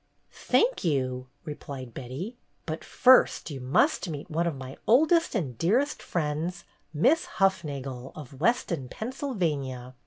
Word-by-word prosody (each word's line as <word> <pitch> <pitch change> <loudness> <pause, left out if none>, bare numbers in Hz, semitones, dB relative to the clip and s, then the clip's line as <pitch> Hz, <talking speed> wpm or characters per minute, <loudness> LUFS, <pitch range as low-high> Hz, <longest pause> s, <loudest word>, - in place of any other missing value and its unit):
"Thank - - +1
you!" 130 -5 0 0.2
replied 140 -5 -7
Betty. 135 - -6 0.3
"But 160 0 -4
first 255 -9 +4
you 135 - -5
must 160 - +2
meet 150 +2 -6
one 170 +2 +1
of 165 - -1
my 130 0 -8
oldest 320 +7 +4
and 145 - -1
dearest 250 - +1
friends, 170 +2 -2 0.3
Miss 175 - +3
Hufnagel, 140 - -1
of 140 -2 -10
Weston, 170 - +1
Pennsyl 260 - -4
vania. 135 - -2
155 Hz, 130 wpm, -27 LUFS, 135-210 Hz, 0.3 s, first